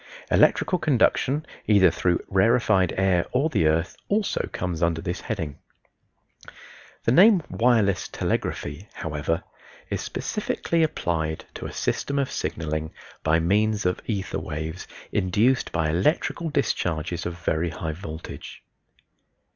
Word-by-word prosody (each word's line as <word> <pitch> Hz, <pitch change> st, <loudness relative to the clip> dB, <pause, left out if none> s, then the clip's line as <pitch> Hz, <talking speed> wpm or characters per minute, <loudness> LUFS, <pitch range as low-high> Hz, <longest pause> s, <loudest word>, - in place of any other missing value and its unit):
Electrical 180 Hz, -, +4 dB
conduction, 145 Hz, 0 st, +2 dB, 0.2 s
either 100 Hz, -5 st, +6 dB
through 85 Hz, +1 st, 0 dB
rarefied 100 Hz, -2 st, +3 dB
air 95 Hz, -2 st, +2 dB
or 140 Hz, +5 st, +2 dB
the 100 Hz, -, +3 dB
earth, 80 Hz, +3 st, +1 dB
also 205 Hz, 0 st, 0 dB
comes 90 Hz, -3 st, -3 dB
under 85 Hz, -1 st, +2 dB
this 90 Hz, +1 st, -4 dB
heading. 80 Hz, -10 st, -4 dB, 1.4 s
The -, -, +2 dB
name 190 Hz, -, +6 dB
"Wireless 115 Hz, -5 st, +2 dB
Telegraphy," 75 Hz, +8 st, -3 dB
however, 80 Hz, +1 st, -2 dB, 0.5 s
is -, -, -1 dB
specifically 165 Hz, -1 st, -1 dB
applied 80 Hz, -, -1 dB
to -, -, -6 dB
a -, -, -7 dB
system 140 Hz, -, -1 dB
of 140 Hz, -2 st, 0 dB
signaling 80 Hz, -1 st, -3 dB, 0.3 s
by 80 Hz, +1 st, +3 dB
means 105 Hz, +5 st, +1 dB
of 90 Hz, 0 st, 0 dB
ether 100 Hz, -4 st, -2 dB
waves 80 Hz, +3 st, -5 dB, 0.2 s
induced 105 Hz, +7 st, +2 dB
by 80 Hz, -2 st, 0 dB
electrical 150 Hz, -, +1 dB
discharges 85 Hz, -, -1 dB
of 85 Hz, -1 st, -5 dB
very 80 Hz, +2 st, +1 dB
high 80 Hz, -2 st, -4 dB
voltage. 80 Hz, -1 st, -8 dB
90 Hz, 125 wpm, -25 LUFS, 80-120 Hz, 1.4 s, either